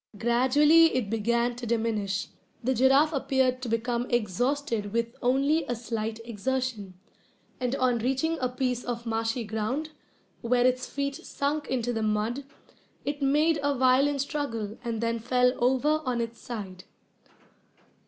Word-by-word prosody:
Gradually 280 +8 +4
it 225 -5 -1
began 235 +2 +1
to 245 -1 -6
diminish. 215 -4 -1 0.3
The 260 +3 +2
giraffe 270 +5 +4
appeared 265 -2 +1
to 250 - -4
become 235 +2 -1
exhausted 240 - 0
with 230 0 -1
only 275 +6 +2
a 245 - -2
slight 225 -1 -4
exertion; 235 -3 -3 0.6
and 250 +1 -1
on 255 -3 +1
reaching 270 +7 0
a 255 - 0
piece 250 -1 -2
of 235 -1 -4
marshy 225 +1 -1
ground, 220 +9 -3 0.5
where 245 +1 +2
its 255 0 +1
feet 280 0 -3
sunk 295 -3 -3
into 245 -2 -1
the 225 - -2
mud, 215 +5 -1 0.6
it 285 +1 -3
made 300 +3 +3
a 285 0 +1
violent 265 +2 +3
struggle 230 -8 -3
and 230 -2 -3
then 230 0 0
fell 250 +2 +2
over 275 +5 +2
on 250 -3 -1
its 230 0 -4
side. 195 -6 -7
250 Hz, 145 wpm, -27 LUFS, 230-275 Hz, 0.6 s, Gradually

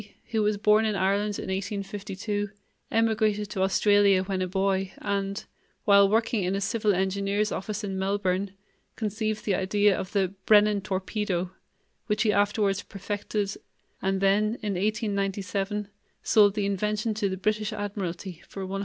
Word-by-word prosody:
B., - - -19 0.2
who 220 -2 +1
was 210 0 +1
born 210 +1 +4
in 215 -1 0
Ireland 200 +2 +1
in - - -5
1852, 200 +1 -3 0.4
emigrated 215 -2 +1
to 195 -3 -2
Australia 200 0 +4
when 190 -1 -2
a 185 - 0
boy 190 0 0
and 200 0 -2 0.4
while 200 -1 +6
working 225 0 +1
in 185 +2 0
a - - 0
civil 210 0 +1
engineer's 200 +3 0
office 210 +2 -4
in 195 -2 -3
Melbourne 195 0 0 0.5
conceived 215 0 -2
the 205 - +1
idea 205 +2 +2
of 185 - -5
the 195 -2 +1
"Brennan 210 -1 +5
Torpedo", 190 -1 -2 0.6
which 210 - +1
he 210 -2 +3
afterwards 205 -1 +2
perfected, 205 +1 -3 0.5
and 190 0 0
then 210 +3 +3
in 205 -1 -1
1897 200 0 -1 0.3
sold 205 -2 +5
the 205 -2 0
invention 210 +3 -1
to 210 -2 -1
the 190 - -3
British 215 +2 0
Admiralty 190 -4 -5
for 195 -1 -6
£110,000. 195 +1 -4
200 Hz, 155 wpm, -27 LUFS, 195-210 Hz, 0.6 s, while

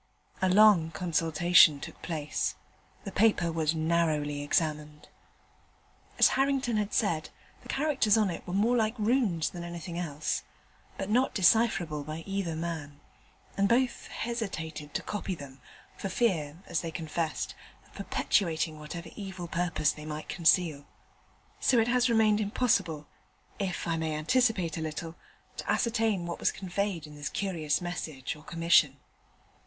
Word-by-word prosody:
A 185 - +3
long 195 -4 +6
consultation 165 -1 +4
took - - -9
place. 155 -4 -2 0.5
The 195 - -6
paper 195 -6 +3
was 160 -1 0
narrowly 155 -3 0
examined. 150 0 -2 1.1
As - - +7
Harrington 270 -4 +1
had 210 -1 -1
said, 165 -8 0 0.3
the - - -14
characters 270 -7 +2
on 210 -4 +2
it 165 - -6
were 180 - -3
more 225 +5 +3
like 220 -1 +1
Runes 215 -7 +1
than 175 -1 -7
anything 170 0 -6
else, 150 -3 -2 0.6
but 195 - -3
not 250 +4 +2
decipherable 180 -6 +3
by 155 +2 -6
either 195 -4 -2
man, 160 -3 -5 0.6
and 200 0 +2
both 245 +1 +1
hesitated 160 -10 -5
to - - -1
copy 200 -2 -3
them, 135 -4 -11 0.4
for 195 - -4
fear, 165 -9 0
as 160 - -1
they 165 - -4
confessed, 160 0 -3 0.3
of - - -24
perpetuating 160 -4 0
whatever 165 +3 -8
evil 190 -4 -6
purpose 170 -3 0
they 150 0 -9
might 155 0 -5
conceal. 160 -4 +2 0.7
So 255 - +3
it 225 0 +3
has 250 0 +3
remained 220 -2 +3
impossible 200 -8 0 0.5
(if 190 -4 -2
I 165 -1 0
may 160 -1 -2
anticipate 180 -1 +1
a - - -4
little) 160 +1 -5 0.4
to - - -2
ascertain 225 -6 +1
what 170 - -5
was - - +2
conveyed 190 -3 -3
in 150 - -12
this 145 0 -5
curious 170 -6 -1
message 160 -7 -4
or 150 - -14
commission. 165 -4 +3
170 Hz, 145 wpm, -29 LUFS, 155-210 Hz, 1.1 s, As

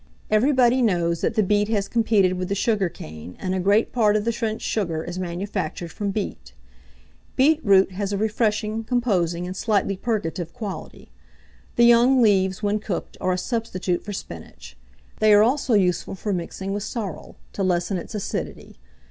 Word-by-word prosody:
Everybody 255 +2 +4
knows 170 -7 +1
that 230 - 0
the 215 - +3
beet 205 +1 +2
has 210 -3 0
competed 215 -5 +2
with 185 0 -4
the 200 - 0
sugar 205 -3 +1
cane, 80 - -10
and 185 -1 -2
a 190 - 0
great 200 +4 +2
part 215 -4 +3
of 210 0 0
the 235 - +2
French 225 -1 -3
sugar 170 -7 -1
is 175 +2 -6
manufactured 175 -2 -4
from 205 +3 -3
beet. 200 +1 -5 0.8
Beetroot 260 -10 +4
has 200 +1 -3
a 200 - -1
refreshing, 215 +1 0
composing, 190 -8 0
and 185 +1 -5
slightly 200 -1 0
purgative 185 -6 -3
quality. 210 -6 -7 0.6
The 235 - +5
young 240 +3 +6
leaves, 190 -3 +2
when 205 +1 +1
cooked, 205 -3 -5
are 185 - +1
a - - -1
substitute 185 -4 -2
for 210 - -6
spinach; 80 - -9 0.4
they 215 -1 +6
are 205 - +7
also 255 0 +2
useful 185 -2 +1
for 205 +2 -3
mixing 190 +2 -4
with 205 - -2
sorrel, 205 -5 -5 0.2
to - - -4
lessen 185 0 0
its 215 - -8
acidity. 205 - -5
205 Hz, 170 wpm, -23 LUFS, 185-220 Hz, 0.8 s, are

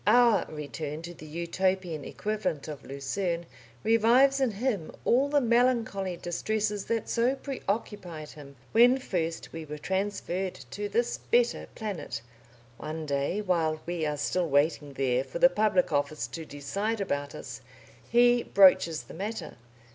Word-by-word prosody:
Our 235 -6 +5
return 150 +1 -5
to 175 +1 -7
the 155 -2 -12
Utopian 170 0 -1
equivalent 205 -9 -3
of 150 -4 -7
Lucerne 170 +6 -3 0.4
revives 240 +5 +5
in 260 - +3
him 205 -6 -2
all 270 +4 +3
the 290 0 +4
melancholy 235 -7 +1
distresses 210 +4 -2
that 230 -2 -1
so 245 +3 +2
preoccupied 200 - -4
him 140 -2 -12 0.2
when 245 +3 +6
first 170 -10 -3
we 165 0 -5
were 150 0 -7
transferred 190 +1 -2 0.2
to 205 0 -4
this 235 +4 0
better 240 0 +1
planet. 190 - -5 0.6
One 155 +1 -5
day, 140 +7 -1
while 165 -5 +1
we 175 -1 -2
are 150 0 -2
still 170 +4 0
waiting 145 0 +1
there 130 -2 +1
for 135 +4 -6
the 260 - +7
public 210 -7 +2
office 145 +1 0
to 165 -1 -6
decide 195 +11 -3
about 145 -7 -2
us, 120 -2 -8 0.5
he 240 +1 +5
broaches 185 -6 +5
the - - -12
matter. 210 +6 -5
185 Hz, 145 wpm, -28 LUFS, 155-220 Hz, 0.6 s, the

